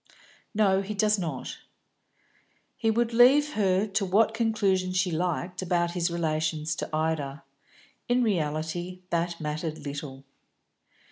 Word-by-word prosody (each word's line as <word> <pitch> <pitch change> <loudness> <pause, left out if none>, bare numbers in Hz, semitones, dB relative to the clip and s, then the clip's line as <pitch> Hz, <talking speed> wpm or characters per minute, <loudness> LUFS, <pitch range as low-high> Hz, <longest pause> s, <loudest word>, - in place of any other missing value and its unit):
"No, 195 -3 +3
he 205 +2 -5
does 210 0 +2
not." 170 -3 -5 1.2
He 225 - 0
would 230 +1 +1
leave 275 +5 +6
her 195 -1 +2
to 205 0 -1
what 210 +4 +3
conclusion 205 -5 +1
she 185 0 +1
liked 175 +2 -2
about 175 -1 0
his 175 0 0
relations 160 -2 -1
to - - -4
Ida; 155 -3 -2 0.7
in 245 +1 +3
reality 175 -1 -2
that 170 0 -1
mattered 155 0 -4
little. 140 -1 -6
180 Hz, 125 wpm, -27 LUFS, 160-210 Hz, 1.2 s, leave